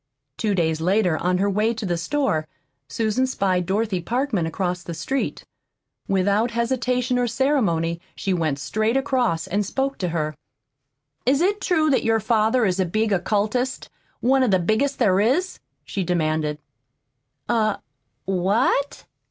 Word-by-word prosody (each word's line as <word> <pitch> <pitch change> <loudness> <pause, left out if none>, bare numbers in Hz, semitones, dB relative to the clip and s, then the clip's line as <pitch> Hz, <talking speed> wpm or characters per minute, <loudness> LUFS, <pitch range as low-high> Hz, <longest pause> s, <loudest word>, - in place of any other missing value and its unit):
Two 210 -3 0
days 160 -3 0
later, 185 0 +2
on 180 +1 +1
her 195 +2 +1
way 215 +4 +1
to 220 -1 -4
the 175 -2 0
store, 170 - -1 0.4
Susan 220 - 0
spied 185 -8 0
Dorothy 200 -2 0
Parkman 235 - -1
across 180 +1 -2
the 170 0 -7
street. 260 +12 -3 0.6
Without 200 +4 +2
hesitation 250 +1 0
or 245 - +1
ceremony 200 - +1
she 195 - -1
went 160 -5 0
straight 215 - 0
across 250 - 0
and 205 +2 0
spoke 270 +7 -2
to 180 - -1
her. 155 -2 -2 0.9
"Is 275 +2 +4
it 400 +4 +1
true 315 -4 +2
that 265 - +3
your 225 0 +2
father 220 +2 +2
is 185 -1 0
a 190 - +3
big 215 +4 0
occultist, 210 +7 -1 0.3
one 265 +2 +3
of 255 - +3
the 190 - +4
biggest 220 +10 0
there 195 -6 +3
is?" 275 - +1 0.3
she 195 - -3
demanded. 155 -3 0 0.9
"A 220 -3 +1 0.5
what?" 200 +9 +1
210 Hz, 150 wpm, -23 LUFS, 180-250 Hz, 0.9 s, Is